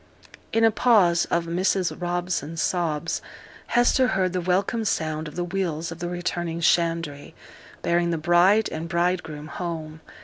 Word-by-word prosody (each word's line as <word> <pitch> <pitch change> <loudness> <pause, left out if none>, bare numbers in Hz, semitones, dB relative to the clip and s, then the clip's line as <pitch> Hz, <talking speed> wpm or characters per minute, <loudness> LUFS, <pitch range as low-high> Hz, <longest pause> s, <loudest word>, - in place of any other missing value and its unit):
In 225 - +2
a 225 - +6
pause 200 -7 +4
of 170 0 0
Mrs 180 +2 0
Robson's 175 -3 -2
sobs, 170 -3 -1 0.5
Hester 245 +2 +3
heard 185 -5 0
the 180 - -1
welcome 190 +6 0
sound 155 -5 -1
of 150 - -10
the 175 - -1
wheels 170 -3 -2
of 165 - -8
the 175 -1 -3
returning 175 -1 -3
shandry, 165 -3 0 0.5
bearing 170 0 +2
the 165 - 0
bride 175 +7 +4
and 160 +1 -5
bridegroom 170 -4 -1
home. 160 -1 -6
175 Hz, 145 wpm, -24 LUFS, 165-185 Hz, 0.5 s, a